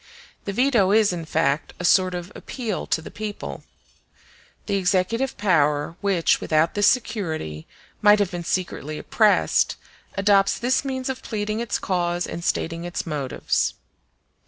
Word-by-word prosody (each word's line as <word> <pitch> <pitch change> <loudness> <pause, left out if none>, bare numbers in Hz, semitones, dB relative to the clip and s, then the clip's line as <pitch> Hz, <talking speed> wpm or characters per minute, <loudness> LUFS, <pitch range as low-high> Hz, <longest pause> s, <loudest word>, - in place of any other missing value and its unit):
The 200 - -2
veto 235 -4 +3
is, 210 -2 +4
in 170 -2 -5
fact, 155 -2 0
a 180 - -3
sort 185 0 +4
of 175 +2 -6
appeal 230 -7 -5
to 160 - 0
the - - -9
people. 210 -1 -6 1.0
The 200 -2 0
executive 195 +7 0
power, 150 -5 +2
which, 195 -5 +2
without 155 +1 +2
this 205 0 +3
security, 160 - -1 0.3
might 210 0 +7
have 205 -3 0
been 175 -1 -4
secretly 160 -4 -3
oppressed, 215 +4 +2 0.4
adopts 195 0 +3
this 250 +2 +1
means 260 -2 -3
of 265 -1 -3
pleading 215 0 -3
its 235 -1 -1
cause 175 -1 -1
and 170 - -6
stating 165 0 -1
its 175 0 -4
motives. 145 -5 -1
185 Hz, 145 wpm, -23 LUFS, 165-210 Hz, 1.0 s, might